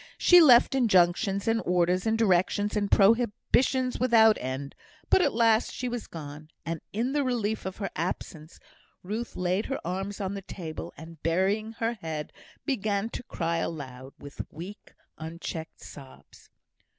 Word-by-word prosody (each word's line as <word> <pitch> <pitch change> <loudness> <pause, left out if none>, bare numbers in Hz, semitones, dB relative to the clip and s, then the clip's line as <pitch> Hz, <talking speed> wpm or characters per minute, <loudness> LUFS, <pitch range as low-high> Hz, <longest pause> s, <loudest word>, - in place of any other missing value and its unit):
She 355 -1 +7
left 250 -6 +7
injunctions, 195 -4 +2
and 225 0 +2
orders, 180 +2 +1
and 220 0 +2
directions, 205 0 +2
and 205 -1 0
prohibitions 240 +5 +2
without 225 -3 +5
end; 130 +2 -5 0.4
but - - +6
at - - +2
last 225 0 +3
she 250 - -4
was 245 -2 -4
gone, 150 -1 -9 0.2
and 165 -1 -4
in 235 +5 -1
the 290 0 +1
relief 220 -6 -1
of 190 - -6
her 195 -2 -4
absence, 160 -1 -5 0.4
Ruth 220 +6 -5
laid 180 +3 -1
her 270 - -3
arms 195 +4 -4
on 195 -1 -3
the 200 - -5
table, 170 -4 -7
and, 160 0 -12
burying 195 +7 0
her 230 +1 -1
head, 155 -2 -5 0.3
began 215 -5 -1
to - - -5
cry 170 -7 -2
aloud, 135 -5 -5
with 145 0 -8
weak, 180 +7 -10 0.2
unchecked 160 0 -7
sobs. 135 -2 -14
195 Hz, 150 wpm, -27 LUFS, 165-225 Hz, 0.4 s, She